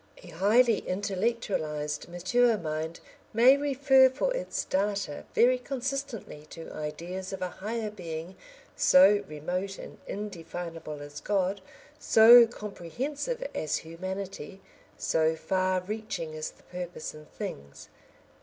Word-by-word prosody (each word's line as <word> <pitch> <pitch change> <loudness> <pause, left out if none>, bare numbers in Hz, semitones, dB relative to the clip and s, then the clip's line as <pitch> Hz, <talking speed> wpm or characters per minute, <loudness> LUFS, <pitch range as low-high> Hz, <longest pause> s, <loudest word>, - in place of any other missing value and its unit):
A 180 - -11
highly 215 +7 +4
intellectualised 185 -7 -2
mature 225 +7 +2
mind 160 -1 -4 0.3
may 245 +5 +7
refer 275 -2 +5
for 285 - -1
its - - -2
data 200 -5 -1
very 250 +1 +5
consistently 265 - -5
to 165 +1 -9
ideas 170 +5 -5
of 190 -1 -4
a 180 - -2
higher 215 +2 -4
being 170 -2 -7 0.4
so 210 -7 +6
remote 180 +6 -4
and - - -10
indefinable 165 -6 -6
as 145 0 -9
God, 195 -1 0 0.4
so 230 +2 +8
comprehensive 270 - -4
as 155 -1 -1
humanity, 190 +2 -6 0.4
so 160 0 +1
far 185 +2 0
reaching 190 -5 -5
as 155 0 -4
the - - -21
purpose 180 -2 -6
in 155 0 -13
things. 70 0 -8
190 Hz, 115 wpm, -28 LUFS, 165-235 Hz, 0.4 s, so